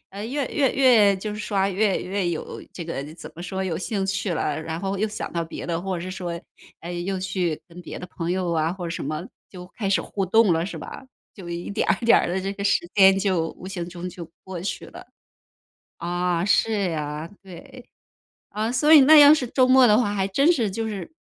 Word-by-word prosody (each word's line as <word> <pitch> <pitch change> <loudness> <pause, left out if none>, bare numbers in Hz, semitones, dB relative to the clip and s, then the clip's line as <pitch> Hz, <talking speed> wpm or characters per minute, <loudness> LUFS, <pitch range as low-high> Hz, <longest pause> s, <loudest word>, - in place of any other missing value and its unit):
呃， 200 +2 -7
越 270 +2 -2
越 275 -4 +1
越 225 -7 +5
就 210 +2 -5
是 - - -7
刷， 195 -2 0
越 195 +1 +1
越 190 -1 -2
有 160 - -6
这 170 - -7
个 140 -4 -4
怎 - - -10
么 170 - -9
说， 190 +1 -4
有 175 -4 -2
兴 195 +2 -2
趣 195 -1 -1
了。 150 -1 -2
然 160 +1 -5
后 195 0 -2
又 215 +3 0
想 215 - -5
到 170 -1 -1
别 165 - -8
的， 170 -1 -2
或 185 -1 -3
者 - - -6
是 185 - -5
说， 175 -2 -5 0.4
哎， 175 +1 -7
又 185 +2 -3
去 185 -4 -2
跟 175 +1 -12
别 - - -8
的 180 - -8
朋 170 -1 -5
友 185 -1 -1
啊， 160 0 0
或 185 -2 -7
者 165 - -5
什 165 - -4
么， 155 +5 -4 0.2
就 180 -2 -10
开 200 -4 -2
始 200 - +3
互 195 -2 -3
动 210 0 +4
了 165 - 0
是 190 - -6
吧？ - - -9 0.3
就 185 -4 -10
一 170 +2 -5
点 - - -1
儿 - - +3
一 - - -5
点 - - +7
儿 - - -1
地 185 +2 -1
这 195 - -3
个 200 - -5
时 200 -3 +1
间， 195 -1 +6
就 185 -5 0
无 185 - -8
形 175 -3 -5
中 180 0 -6
就 170 -2 -9 0.2
过 190 -2 -7
去 190 - -4
了。 - - -12 0.9
啊， 175 0 -1
是 205 -4 +1
啊， 150 +1 -4
对。 195 +6 -13 0.6
啊， 215 +3 -2
所 300 +5 +4
以 295 - +10
那 305 +4 +8
要 290 +1 +9
是 275 -5 0
周 255 -1 +3
末 260 0 +6
的 210 -1 +5
话， 205 -4 +1
还 195 -2 0
真 275 - +3
是 225 - -1
就 225 +2 -3
是， 210 - -6
190 Hz, 255 characters per minute, -24 LUFS, 175-210 Hz, 0.9 s, 以